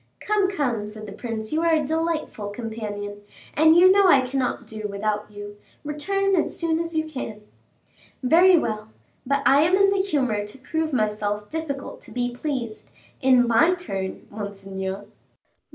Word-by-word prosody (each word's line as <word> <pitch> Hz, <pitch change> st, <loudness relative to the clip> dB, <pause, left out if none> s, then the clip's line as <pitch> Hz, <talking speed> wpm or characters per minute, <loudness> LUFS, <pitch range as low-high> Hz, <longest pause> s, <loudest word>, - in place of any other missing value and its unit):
"Come, 415 Hz, -2 st, +1 dB
come," 245 Hz, -, -1 dB
said 215 Hz, 0 st, -9 dB
the 205 Hz, -, -8 dB
prince, 220 Hz, +2 st, -5 dB
"you 315 Hz, -, +1 dB
are 335 Hz, -1 st, +3 dB
a 305 Hz, -2 st, 0 dB
delightful 320 Hz, -8 st, -2 dB
companion, 205 Hz, -2 st, -6 dB, 0.3 s
and 315 Hz, +1 st, +5 dB
you 370 Hz, +2 st, +8 dB
know 395 Hz, 0 st, +5 dB
I 275 Hz, -7 st, +6 dB
cannot 255 Hz, 0 st, -2 dB
do 215 Hz, -1 st, -5 dB
without 210 Hz, +1 st, -2 dB
you. 205 Hz, 0 st, -9 dB, 0.3 s
Return 390 Hz, +7 st, 0 dB
as 335 Hz, -, 0 dB
soon 330 Hz, -1 st, +1 dB
as 335 Hz, 0 st, -4 dB
you 315 Hz, -, +2 dB
can." 240 Hz, -8 st, -6 dB, 0.8 s
"Very 345 Hz, +7 st, +6 dB
well; 215 Hz, -7 st, -2 dB, 0.4 s
but 280 Hz, +1 st, +1 dB
I 275 Hz, +2 st, +6 dB
am 340 Hz, +4 st, +4 dB
in 395 Hz, 0 st, +4 dB
the 395 Hz, -1 st, +2 dB
humor 260 Hz, -, 0 dB
to 210 Hz, +5 st, -10 dB
prove 315 Hz, +4 st, -2 dB
myself 210 Hz, -3 st, -1 dB
difficult 300 Hz, -4 st, -5 dB
to -, -, -13 dB
be 245 Hz, 0 st, -1 dB
pleased, 245 Hz, -4 st, -4 dB, 0.3 s
in 255 Hz, -2 st, +5 dB
my 300 Hz, +10 st, +4 dB
turn, 195 Hz, -, -5 dB
monseigneur." 195 Hz, -1 st, -5 dB
255 Hz, 165 wpm, -24 LUFS, 210-320 Hz, 0.8 s, you